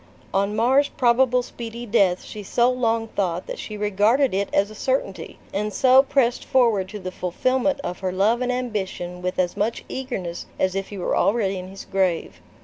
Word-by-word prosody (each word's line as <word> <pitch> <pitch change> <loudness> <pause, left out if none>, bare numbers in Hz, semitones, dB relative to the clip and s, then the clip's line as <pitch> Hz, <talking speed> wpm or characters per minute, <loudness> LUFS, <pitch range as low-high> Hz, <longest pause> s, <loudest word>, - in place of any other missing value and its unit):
On 200 +2 +1
Mar's 265 +6 +3
probable 250 -1 +3
speedy 235 0 -7
death 195 -5 +2
she 215 - -8
so 240 +5 +2
long 230 -2 0
thought 180 -4 -2
that - - -6
she 215 - -6
regarded 210 +6 +2
it 200 +1 0
as 200 +2 +2
a - - -9
certainty, 260 -3 -2 0.2
and 210 +2 -1
so 260 +5 +6
pressed 265 -3 +1
forward 225 -7 +2
to 210 - -6
the 185 -2 -6
fulfillment 255 +11 0
of 180 -7 -5
her 185 -1 -2
love 210 +6 +2
and 250 0 0
ambition 195 -7 -3
with 180 0 -3
as 180 -1 0
much 225 +3 -2
eagerness 195 -10 -5
as 185 -1 +1
if 195 0 -3
he 205 - -7
were 180 - -1
already 195 -3 +1
in 180 - -7
his 195 +1 -10
grave. 190 -4 -1
210 Hz, 190 wpm, -23 LUFS, 190-245 Hz, 0.2 s, so